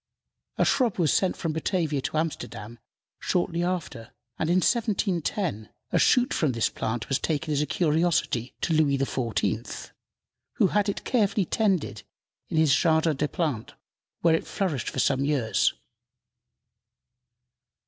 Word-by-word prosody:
A - - +3
shrub 250 -7 +2
was 165 -5 +2
sent 190 - +1
from 165 -2 -2
Batavia 160 -3 -1
to 155 +3 -3
Amsterdam 120 -8 -4 0.4
shortly 175 -1 0
after, 165 -10 -4 0.3
and 160 - 0
in 175 - +3
1710 185 - 0 0.2
a - - +2
shoot 250 0 +3
from 150 -6 +1
this 115 - +1
plant 115 +1 -3
was 135 - 0
taken 155 0 -1
as 145 - +1
a 150 - -1
curiosity 155 -5 0
to 165 - 0
Louis 150 -3 +3
XIV., 130 -4 -2 0.6
who - - +3
had 205 -1 +1
it 200 - -3
carefully 205 -5 +1
tended 185 - 0 0.5
in - - -2
the 160 - +5
Jardin 160 +1 +3
des 150 - 0
Plants, 150 - -3 0.5
where 165 -1 +4
it 160 - 0
flourished 165 - -2
for - - -9
some 135 0 +2
years. 125 -9 +1
160 Hz, 140 wpm, -26 LUFS, 135-180 Hz, 0.6 s, the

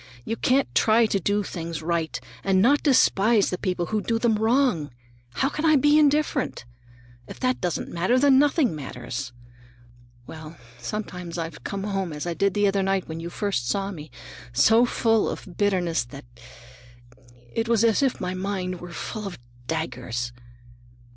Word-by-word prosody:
You 225 - -2
can't 260 +3 +1
try 225 +1 +4
to 205 -2 0
do 205 +3 0
things 165 -4 -5
right 165 -5 -1 0.2
and 190 -1 +3
not 275 +9 +4
despise 230 -6 +3
the 180 - -1
people 180 -3 -1
who 215 - +1
do 230 +1 0
them 225 -2 +2
wrong. 220 - +2 0.5
How 270 - +2
can 300 +2 -4
I 315 -1 +5
be 295 +2 +5
indifferent? 295 - +1 0.6
If - - -10
that 255 0 0
doesn't 175 -3 -2
matter, 185 +9 +2
then 270 0 +5
nothing 290 - +3
matters. 125 -3 -6 0.9
Well, 155 +2 -10 0.2
sometimes 180 - -5
I've 165 -2 -5
come 195 -1 -4
home 195 -5 -2
as 150 +2 -5
I 175 - -2
did 200 +2 0
the 205 0 +3
other 195 0 +2
night 195 -1 0
when 160 0 -6
you 170 +1 -5
first 170 -11 -2
saw 195 +6 -1
me, 155 -5 -9 0.4
so 220 - +5
full 225 -2 +2
of - - -6
bitterness 180 -7 +1
that 135 +2 -11 1.3
it 225 0 -1
was 230 -2 +3
as 230 +1 +3
if 270 -3 +1
my 180 0 -3
mind 185 -1 -3
were 175 -1 -9
full 210 +4 -5
of 195 - -7 0.3
daggers. 125 -7 -3
195 Hz, 165 wpm, -25 LUFS, 165-230 Hz, 1.3 s, I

